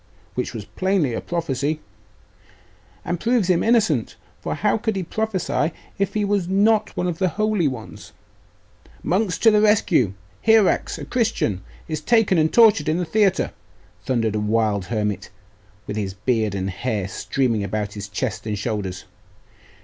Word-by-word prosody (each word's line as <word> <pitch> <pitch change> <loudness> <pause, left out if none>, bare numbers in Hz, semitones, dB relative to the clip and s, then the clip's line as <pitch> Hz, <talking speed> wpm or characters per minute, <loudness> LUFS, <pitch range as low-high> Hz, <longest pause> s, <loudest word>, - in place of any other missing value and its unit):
'Which 125 - -2
was 105 -3 -6
plainly 185 - 0
a - - -3
prophecy!' 155 -3 -2 1.3
'And 175 - -2
proves 230 -4 +2
him 170 - +2
innocent; 215 - +2 0.2
for - - -3
how 210 +1 +1
could 220 -1 -1
he 190 - -1
prophesy 190 -4 -1 0.3
if 200 +1 -1
he 210 -1 +1
was 200 -3 0
not 210 +3 +2
one - - 0
of 175 -2 -2
the 185 -1 +2
holy 215 -2 +1
ones?' 125 -5 -7 0.9
'Monks, 185 0 0
to 225 - +5
the 210 0 +4
rescue! 185 - +3 0.3
Hierax, 220 -3 +3
a - - -7
Christian, 220 - 0 0.3
is 155 -2 -3
taken 215 -2 +3
and 155 0 +2
tortured 220 -7 +5
in 155 - +1
the 180 - -1
theatre!' 205 +1 +2 0.5
thundered 115 -3 0
a 105 - 0
wild 105 -2 +1
hermit, 105 -1 -2 0.6
his 100 -2 -3
beard 110 -1 0
and 95 0 -2
hair 105 -1 -2
streaming 115 +1 -1
about 105 +1 -3
his 100 -1 -7
chest 100 +2 -3
and 105 -1 -2
shoulders. 100 -3 -3
160 Hz, 155 wpm, -22 LUFS, -, 1.3 s, to